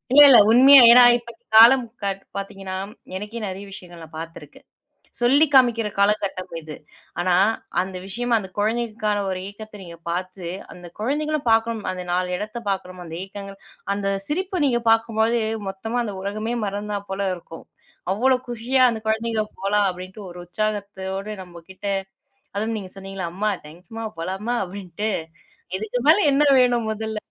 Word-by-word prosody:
இல்ல, 290 - +10
இல்ல 245 - +9
உண்மையா, 265 +3 +9
ஏனா 245 +1 +9 0.2
இப்போ 235 0 -12 0.2
காலம் 240 +2 +8 0.2
காட் 195 -1 -2 0.2
பாத்தீங்கன்னா, 195 -1 -6 0.4
எனக்கே 210 +4 -7
நிறைய 195 +2 -7
விஷயங்கள் 175 -3 -11
நான் 155 0 -12
பாத்துருக்கேன். 160 -3 -11 0.5
சொல்லி 265 +6 +4
காமிக்கிற 240 -4 +4
காலகட்டம் 200 -2 0
இது. 155 -1 -9 0.4
ஆனா, 175 0 +2 0.5
அந்த 185 0 -5
விஷயமா 240 +5 -2
அந்த 190 -3 -8
குழந்தைகளுக்கான 215 -1 -1
ஒரு 185 - -3
ஏக்கத்த 210 0 -11
நீங்க 170 -2 -11
பாத்து, 180 +1 -4 0.3
அந்த 175 -1 -12
குழந்தைங்களும் 295 +3 -2
பாக்கணும் 225 0 +1
அந்த 185 -1 -6
நாலு 180 0 0
எடத்தை 215 +4 -5
பாக்குறமோ, 185 -2 -4
அந்த 165 - -8
ஏக்கங்கள், 195 0 -9 0.4
அந்த 200 -1 -2 0.2
சிரிப்பு 370 +2 -2
நீங்க 240 -3 +2
பாக்கும்போது 225 +1 +2 0.3
மொத்தமா 225 +5 -4
அந்த 210 -3 -5
உலகமே 215 +4 -3
மறந்தா 205 +1 -3
போல 195 0 -1
இருக்கும், 165 -1 -12 0.5
அவ்ளோ 255 +5 +3
குஷியா 245 +3 +1
அந்த 225 -2 -4
குழந்தைங்க 220 0 0 0.2
"போலாம்" 200 0 +2
அப்டின்ட்டு 185 +3 -10
ஒரு 175 - -10
உற்சாகத்தோடு 200 0 -4
நம்ம 175 -1 -13
கிட்ட, 190 +2 -12 0.7
அதுவும் 220 +2 -2
நீங்க 185 -3 -8
சொன்னீங்கள்ல 195 -3 -6
"அம்மா 210 +2 0
டேங்க்ஸ்மா, 180 +8 -9
போலாம்மா" 195 +8 -3
அப்டின்ட்டு, 195 +2 -5 0.7
இதுக்கு 220 +4 -3
மேல 325 - +7
என்ன 290 +2 +3 0.2
வேணும் 240 -3 +2
முதல்ல? 220 0 -4
210 Hz, 145 wpm, -22 LUFS, 190-230 Hz, 0.7 s, இல்ல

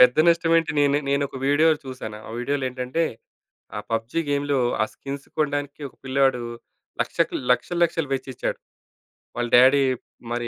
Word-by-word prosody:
పెద్ద 125 0 +7
నష్టమేంటి, 165 -1 +3
నేను, 145 0 +3
నేనొక 140 -1 0
వీడియో 150 +3 +4 0.2
చూశాను. 125 -5 -7
ఆ - - -9
వీడియోలో 135 +2 -1
ఏంటంటే, 130 +6 -1 0.7
ఆ - - -2
పబ్‌జీ 115 +8 -1
గేమ్‌లో 145 -1 +1 0.2
ఆ - - +4
స్కిన్స్ 140 0 -7
కొనడానికి 145 0 -1
ఒక - - -23
పిల్లాడు 135 -1 +2 0.6
లక్షకి - - 0 0.2
లక్షలు, 150 +8 -2
లక్షలు 165 -3 -1
వెచ్చిచ్చాడు. 130 -1 -4 0.8
వాళ్ళ 120 0 0
డ్యాడీ 135 +2 +6 0.5
మరి 120 0 -2
140 Hz, 140 wpm, -24 LUFS, 125-145 Hz, 0.8 s, పెద్ద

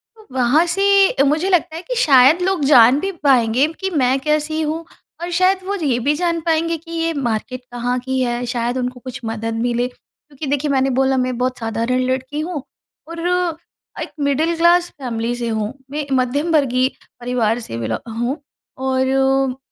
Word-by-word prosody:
तो 435 -1 -18
वहाँ 260 +6 +3
से 390 -3 +3
मुझे 305 +6 +1
लगता 345 -3 +1
है 330 - -5
कि - - -5
शायद 285 - +5
लोग 370 -3 0
जान 255 -1 +6
भी 390 +4 -2
पाएँगे 255 -1 +4
कि 385 - -1
मैं 270 -6 +1
कैसी 305 +2 0
हूँ 315 +2 -3 0.4
और 345 - -3
शायद 370 +2 +3
वो 400 +1 -2
ये 290 -10 0
भी 280 +5 +1
जान 335 +1 0
पाएँगे 330 +1 0
कि 330 +2 -14
ये 330 0 -1
मार्केट 250 -2 -3
कहाँ 245 +1 -1
की 260 +1 -2
है। 240 0 -1
शायद 240 0 -2
उनको 250 0 -3
कुछ 255 +1 -8
मदद 225 0 -3
मिले, 240 0 0
क्योंकि 280 +3 -13
देखिए 285 +1 0
मैंने 270 0 +2
बोला 265 0 +2
मैं 255 -1 -1
बहुत 255 0 -1
साधारण 230 +2 -1
लड़की 260 +3 -3
हूँ 310 -3 -4 0.5
और 335 0 -7 0.8
एक - - -5
मिडिल 295 +4 +1
क्लास 345 +1 +4
फैमिली 235 -1 -2
से 240 -1 -3
हूँ। 220 +1 -2 0.2
मैं 295 0 -3
मध्यम 270 +6 0
वर्गीय 260 -4 +2 0.3
परिवार 240 -2 0
से 170 - -7
बेलो 115 -1 -2 0.2
हूँ 250 +6 -2 0.4
और 265 0 +1
270 Hz, 175 wpm, -19 LUFS, 245-320 Hz, 0.8 s, जान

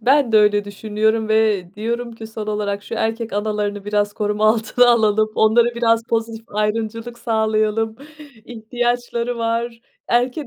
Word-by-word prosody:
Ben 260 +1 +3
de 220 - +6
öyle 210 -1 +4
düşünüyorum 215 +2 -1
ve 220 -4 +2
diyorum 235 +3 -3
ki 225 -1 -9
son 220 -1 -7
olarak, 205 -1 -2
şu 230 - -6
erkek 225 +1 -2
analarını 205 -1 -2
biraz 205 0 0
koruma 210 +1 0
altına 230 +2 +3
alalım, 215 -2 +3
onlara 235 +2 +3
biraz 230 -1 +2
pozitif 225 0 -2
ayrımcılık 225 +3 -3
sağlayalım. 220 0 0 0.5
İhtiyaçları 240 +1 -2
var, 230 0 -2 0.3
erken 250 +4 0
220 Hz, 140 wpm, -20 LUFS, 210-235 Hz, 0.5 s, de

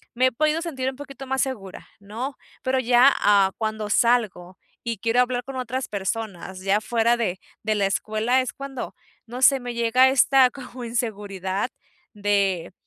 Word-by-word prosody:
me 255 +2 +4
he - - 0
podido 310 +5 +1
sentir 265 -6 -2
un 265 - -8
poquito 275 -1 -9
más 265 0 0
segura, 210 -8 -5
¿no? 225 +7 -6 0.3
Pero 260 0 +1
ya, 250 +2 +5
ah, 200 -2 +4
cuando 215 -1 -3
salgo 205 -6 +1 0.3
y 230 -2 -3
quiero 230 +3 +2
hablar 250 0 -1
con 270 +2 -8
otras 255 +1 -3
personas 195 -2 -4
ya 195 +2 +1
fuera 235 +1 +2
de 190 -6 -2 0.2
de 215 0 0
la 200 -1 +1
escuela 220 +5 +1
es 255 - -4
cuando, 275 -2 -7 0.3
no 245 +3 -7
sé, 270 0 +6
me 245 -1 -5
llega 235 +3 +4
esta 265 0 +5
como 255 -2 -9
inseguridad 205 -3 -3 0.4
de 200 -4 0
235 Hz, 170 wpm, -24 LUFS, 205-260 Hz, 0.4 s, sé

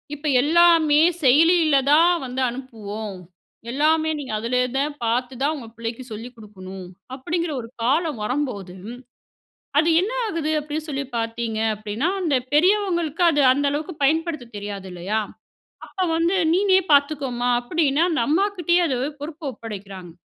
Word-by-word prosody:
இப்ப 295 +1 -6
எல்லாமே 320 0 +5 0.2
செயலியில 315 +3 +5
தான் 335 +4 +6
வந்து 255 +1 -4
அனுப்புவோம். 220 -5 -7 0.5
எல்லாமே 310 +4 +2
நீங்க 265 -6 -6
அதிலே 245 +3 0 0.2
தான் 290 +2 -1
பாத்து 245 +3 -1
தான் 290 +3 +1
உங்க 255 -6 -9
புள்ளைக்கு 230 +2 -5
சொல்லிக் 230 +3 -8
குடுக்கணும், 190 -3 -10 0.3
அப்படிங்கிற 335 +5 -3
ஒரு 230 - -10
காலம் 290 0 0
வரம்போது, 210 -8 -3 1.1
அது 320 - 0
என்ன 420 +6 -2
ஆகுது? 325 -6 -2
அப்படின்னு 300 +1 -5
சொல்லி 275 0 -3
பார்த்தீங்க 230 -1 -3 0.2
அப்டீன்னா, 215 - -2
அந்த 305 -6 +1 0.2
பெரியவங்களுக்கு 350 -2 +2
அது 290 -2 +2
அந்த 285 +2 0
அளவுக்கு 310 +5 -4
பயன்படுத்த 310 -4 0
தெரியாது 200 -2 -6
இல்லையா? 190 +5 -2 0.7
அப்ப 380 - -6
வந்து 335 +3 +1 0.2
நீனே 380 +1 +4
பார்த்துக்கோமா, 280 -4 +1
அப்டின்னு 285 +3 +1
அந்த 320 - 0
அம்மாகிட்டேயே 355 0 +2
அந்த 260 -4 -1 0.2
பொறுப்ப 305 +2 -7
ஒப்படைக்கிறாங்க. 195 -6 -9
285 Hz, 135 wpm, -22 LUFS, 230-325 Hz, 1.1 s, தான்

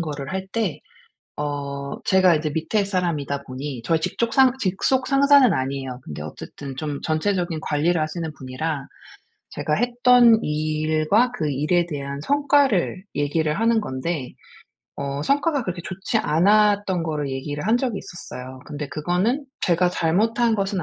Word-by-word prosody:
거를 150 -1 -4
할 190 0 -3
때 210 -5 -2 0.6
어 140 -1 -4
제가 185 -3 +5
이제 155 0 -2
밑에 180 +7 0
사람이다 165 -7 -2
보니 130 -1 -6
저희 165 +3 +1
직족 230 +7 -1
상 265 -2 +6
직속 255 +5 0
상사는 275 -4 +6
아니에요. 135 -2 -3
근데 75 0 -7
어쨌든 135 - -8
좀 145 0 -4
전체적인 175 +1 0
관리를 160 +3 +1
하시는 155 +1 -3
분이라 135 +2 -4 0.6
제가 150 - -3
했던 245 0 +5
일과 155 +9 +1
그 155 -11 -2
일에 160 +5 +1
대한 140 -2 -5
성과를 280 - +2
얘기를 150 +4 0
하는 225 -1 +3
건데 130 -2 -4 0.6
어 140 0 -3
성과가 285 - +1
그렇게 180 -3 -4
좋지 190 +5 -2
않았던 200 +1 +3
거를 150 -4 -2
얘기를 145 +4 -4
한 225 +3 +3
적이 245 -6 -1
있었어요. 130 -6 -9
근데 150 0 -5
그거는 185 - -1 0.2
제가 180 0 +3
잘못한 220 +7 +1
것은 195 -3 -1
170 Hz, 310 characters per minute, -23 LUFS, 145-210 Hz, 0.6 s, 상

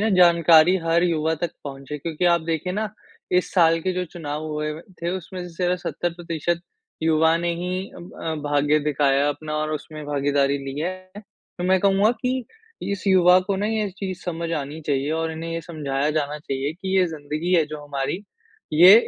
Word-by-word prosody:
ना 220 - +2
जानकारी 170 0 +6
हर 165 +1 +3
युवा 160 -2 +1
तक 170 - 0
पहुँचे 140 +1 -6
क्योंकि 165 +3 -3
आप 170 -1 +4
देखिए 165 +2 -2
ना 215 +2 -1 0.4
इस 180 0 +2
साल 165 -2 +5
के 185 +2 -1
जो 180 0 -1
चुनाव 155 -3 -5
हुए 150 0 -2
व 160 - -8 0.2
थे 170 - 0
उसमें 185 0 -7
से 180 +1 0
70% 170 -1 -2 0.4
युवा 160 0 +4
ने 170 0 0
ही 180 +3 -3
अब 175 0 -10
अ, 160 -1 -1
भाग्य 145 +1 +3
दिखाया 145 -1 +2
अपना 155 +1 -4
और 155 0 -1
उसमें 155 0 -6
भागीदारी 140 -1 +1
ली 135 +1 -6
है। 185 +2 -4
तो 205 -3 -10
मैं 185 +1 +4
कहूँगा 200 +2 +4
कि 255 0 -1 0.5
इस 200 0 -5
युवा 180 -1 +6
को 195 +1 -2
ना 205 +2 0
ये 215 -1 0
चीज़ 185 -2 -4
समझ 170 -1 -3
आनी 150 0 -3
चाहिए 140 0 0
और 160 0 -1
इन्हें 165 +1 -5
ये 165 - -2
समझाया 150 -3 -2
जाना 150 -1 -1
चाहिए 140 0 -3
कि 190 +2 -2
ये 180 - +4
ज़िंदगी 155 +2 -3
है 165 - +5
जो 150 -1 -7
हमारी 145 +7 -3 0.5
ये 180 +6 +9
165 Hz, 190 wpm, -23 LUFS, 150-180 Hz, 0.5 s, ये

